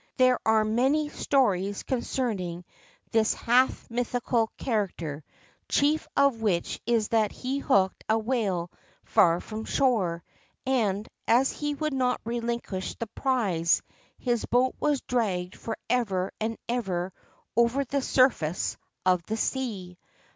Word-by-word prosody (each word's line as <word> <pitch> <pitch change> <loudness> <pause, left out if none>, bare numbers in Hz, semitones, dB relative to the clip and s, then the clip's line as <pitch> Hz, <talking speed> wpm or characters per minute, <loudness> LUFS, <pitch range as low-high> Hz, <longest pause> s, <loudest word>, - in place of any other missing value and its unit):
There 255 -1 +4
are 220 -1 +4
many 265 +7 +2
stories 205 -10 +1
concerning 210 -9 -2 0.5
this 225 -1 +3
half 250 +2 +2
mythical 240 -1 0
character, 175 - -2 0.5
chief 295 +2 +2
of 280 -5 +3
which 185 -6 0
is 230 -3 +2
that 220 -2 +2
he 265 +2 -3
hooked 195 -9 +2
a 220 - +4
whale 215 -7 -1 0.3
far 170 0 +4
from 220 +3 -6
shore, 195 -11 +1 0.4
and, 215 -6 +1 0.2
as 250 +4 +4
he 295 0 -3
would 305 0 -2
not 255 -1 +1
relinquish 235 -5 -3
the 230 - -4
prize, 210 - +1 0.3
his 240 -2 0
boat 255 +1 +2
was 295 -3 +1
dragged 190 -7 -1
for 225 - -5
ever 195 -7 0
and 225 +1 -2
ever 190 -7 -2 0.4
over 235 +4 +3
the 275 +2 -1
surface 255 - +2 0.3
of 180 -1 +4
the 220 - -2
sea. 205 -9 -3
230 Hz, 125 wpm, -27 LUFS, 190-255 Hz, 0.5 s, There